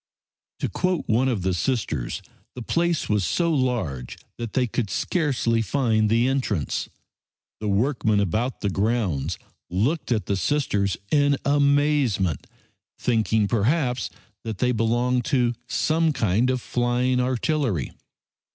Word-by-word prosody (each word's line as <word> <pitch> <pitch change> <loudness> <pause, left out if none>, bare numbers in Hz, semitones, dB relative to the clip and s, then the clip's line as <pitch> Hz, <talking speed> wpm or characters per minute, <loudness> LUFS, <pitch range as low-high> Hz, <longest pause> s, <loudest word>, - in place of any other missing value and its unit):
To - - +1
quote 180 -3 -1
one 120 +3 +2
of 115 -8 -1
the 95 0 +1
Sisters, 90 - -2 0.3
the 125 - -6
place 170 +4 0
was 105 -2 +1
so 165 - +1
large 110 - -1 0.2
that 115 -2 -5
"they 130 - +2
could 115 -3 -2
scarcely 130 - 0
find 110 -2 +1
the 115 +3 +3
entrance." 125 - -1 0.7
The 105 - -3
workmen 110 0 +1
about 110 +7 -1
the 100 - 0
grounds 100 - 0 0.3
looked 125 - 0
at 110 -3 +1
the 100 - 0
Sisters 100 -6 0
in 145 -1 +3
amazement, 140 - +2 0.5
thinking 110 -3 +1
perhaps 125 +3 +1 0.3
that 110 -3 -4
they 125 +3 +2
belonged 120 +2 +1
to 125 -4 +2
some 160 +4 +1
flying 125 +3 +1
artillery. 125 - 0
120 Hz, 125 wpm, -24 LUFS, 105-135 Hz, 0.7 s, the